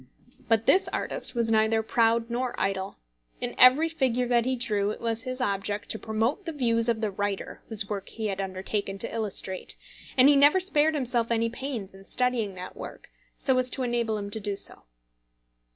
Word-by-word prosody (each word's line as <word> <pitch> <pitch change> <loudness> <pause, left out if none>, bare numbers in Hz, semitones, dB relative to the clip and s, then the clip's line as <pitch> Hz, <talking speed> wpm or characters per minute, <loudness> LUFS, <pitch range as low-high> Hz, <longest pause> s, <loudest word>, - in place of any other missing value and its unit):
But 225 -1 +2
this 380 - +4
artist - - -4
was 230 -1 +1
neither 220 0 +3
proud 230 +1 +2
nor 245 +1 -2
idle. 195 0 -1 0.4
In - - -3
every 260 +6 +7
figure 260 -6 0
that 240 -1 +3
he 260 0 +1
drew 210 -5 0
it 215 - -4
was 230 +1 -2
his 255 0 -4
object 205 -3 -2
to 220 - 0
promote 225 - -1
the 330 - -3
views 235 -5 +1
of 230 -1 0
the 215 -2 0
writer 200 0 -3
whose 210 -3 -2
work 200 -2 -4
he 225 - -5
had 195 -2 -1
undertaken 195 +1 -3
to - - -1
illustrate, 200 -4 -3 0.4
and 255 +1 +7
he 290 - +6
never 290 +6 +6
spared 315 -4 +2
himself 245 -4 0
any 230 0 +1
pains 235 -5 -5
in 195 0 -14
studying 240 -6 0
that 180 0 -8
work, - - -9 0.3
so 265 - +2
as 255 0 +1
to 260 - -3
enable 235 -3 0
him 200 -1 -5
to 220 - -3
do 205 -1 -2
so. - - -2
230 Hz, 195 wpm, -27 LUFS, 205-255 Hz, 0.4 s, every